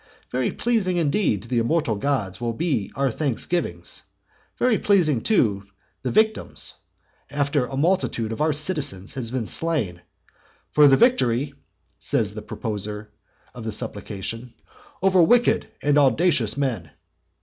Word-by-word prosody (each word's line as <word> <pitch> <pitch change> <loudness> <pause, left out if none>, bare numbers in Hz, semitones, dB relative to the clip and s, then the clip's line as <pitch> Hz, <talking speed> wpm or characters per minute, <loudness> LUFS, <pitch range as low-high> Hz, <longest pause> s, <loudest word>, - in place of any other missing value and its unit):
Very 125 -1 0
pleasing 215 -7 0
indeed 155 - +1
to - - -12
the 120 0 +1
immortal 120 +1 +1
gods 110 -3 -2
will 115 -1 -2 0.4
our 135 -1 +1
thanksgivings 150 +6 -2
be, - - -28 0.5
very 245 -3 +2
pleasing 165 - +3
too 105 - +1 0.3
the 130 - -2
victims, 220 - +1 0.6
after 140 -2 0
a 135 - -5
multitude 150 - +1
of 115 - -4
our 155 +1 +3
citizens 145 - -3
has 130 -5 -4
been 125 -2 -2
slain! 110 - -1 0.7
"For 150 -1 +6
the 135 -1 +6
victory," 140 - +2 0.5
says 105 -2 0
the 110 - -6
proposer 105 -1 -5 0.4
of 120 - -8
the 110 - -3
supplication, 115 +5 -6 0.5
"over 190 -2 +5
wicked 240 +8 +4 0.2
and 145 0 +4
audacious 140 - +3
men." 120 - -2
135 Hz, 135 wpm, -23 LUFS, 110-165 Hz, 0.7 s, For